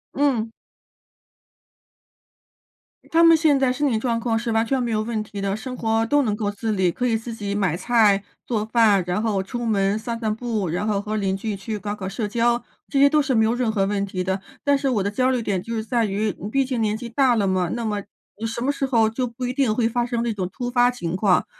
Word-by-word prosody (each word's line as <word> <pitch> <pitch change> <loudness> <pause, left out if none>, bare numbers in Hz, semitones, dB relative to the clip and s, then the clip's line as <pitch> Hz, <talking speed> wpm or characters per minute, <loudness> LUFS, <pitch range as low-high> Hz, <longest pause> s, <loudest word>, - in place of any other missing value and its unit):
嗯。 250 -6 +1 2.6
他 330 +1 +4
们 330 -1 +8
现 305 -4 +3
在 260 -2 +2
身 285 +2 0
体 220 - +1
状 235 -1 0
况 230 -1 0
是 235 0 -3
完 225 +1 +2
全 265 +2 0
没 240 - -1
有 215 -1 +1
问 220 -1 -2
题 205 -1 -7
的， 195 0 -1
生 255 +3 -6
活 225 -1 +1
都 290 +4 +3
能 215 -5 0
够 210 -1 -2
自 220 +2 -3
理， 190 -3 +2
可 250 +8 -2
以 225 -2 +2
自 230 +1 -7
己 205 -2 -4
买 195 -6 0
菜 205 0 +3 0.2
做 215 -3 -1
饭， 220 -5 +4
然 180 +4 -1
后 205 -4 0
出 240 +3 -5
门 200 -1 +1
散 230 +1 -4
散 220 -2 -1
步， 220 -5 -2
然 180 +6 -2
后 200 -2 0
和 215 +1 -3
邻 195 -2 0
居 210 +2 -3
去 210 +2 -5
搞 205 0 -4
搞 190 -2 -5
社 210 +2 -3
交， 235 +2 +1 0.2
这 280 - -2
些 280 +1 +6
都 305 0 +3
是 265 -3 0
没 220 - +4
有 220 - +2
任 245 -1 0
何 200 -3 +1
问 200 0 -1
题 185 -2 -3
的。 190 +1 -2 0.2
但 285 -1 +3
是 275 - -2
我 215 -6 +1
的 200 - -1
焦 255 +4 +1
虑 250 - 0
点 195 -5 -1
就 230 +3 -5
是 220 - -2
在 230 -1 +1
于， 205 0 -1
嗯， 205 - -4
毕 275 +3 +2
竟 255 -3 -2
年 215 -1 +1
纪 235 +1 -6
大 250 0 +3
了 205 -3 +1
嘛， 185 -2 +1
那 235 -1 -3
么 210 -2 -2 0.5
什 230 +1 -4
么 275 +3 +1
时 280 -1 -2
候 230 -4 +3
就 250 +2 -2
不 240 +2 -6
一 245 - -1
定 260 -5 +2
会 230 -1 +2
发 240 +1 0
生 235 -1 -2
这 235 -2 -1
种 185 -3 -3
突 245 +1 -4
发 245 0 +4
情 175 -9 -4
况， 185 -2 +3
225 Hz, 270 characters per minute, -23 LUFS, 205-245 Hz, 2.6 s, 们